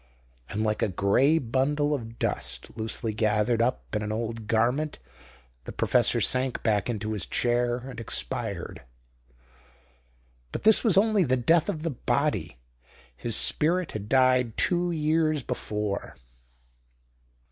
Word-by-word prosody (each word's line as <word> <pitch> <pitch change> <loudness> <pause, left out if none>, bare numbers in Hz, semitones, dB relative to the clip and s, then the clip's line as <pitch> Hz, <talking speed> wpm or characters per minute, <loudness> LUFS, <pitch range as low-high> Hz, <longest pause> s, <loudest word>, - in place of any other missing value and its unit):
And 105 +2 -2
like 110 -1 -1
a - - +2
grey 100 - +2
bundle 145 +3 0
of 115 -4 -6
dust - - -3
loosely 110 0 -2
gathered 110 +2 +1
up 120 -1 -2
in 105 - -1
an 105 0 -4
old 115 0 -4
garment 125 +8 0 0.7
the - - -6
professor - - +1
sank 130 0 +1
back 105 -1 0
into 110 -2 -3
his 100 -6 -4
chair 120 0 0
and 125 0 -9
expired. 65 - -3 1.7
But - - -5
this 220 0 +5
was 215 -6 +3
only 210 -1 +3
the 130 -4 +1
death 165 +7 +2
of 155 - -4
the 165 - -1
body. 120 - -1 0.6
His 115 - 0
spirit 175 +3 +4
had 105 -1 -7
died 130 -3 +2
two 175 0 +1
years 155 -2 0
before. 105 -5 -4
120 Hz, 135 wpm, -26 LUFS, 110-150 Hz, 1.7 s, this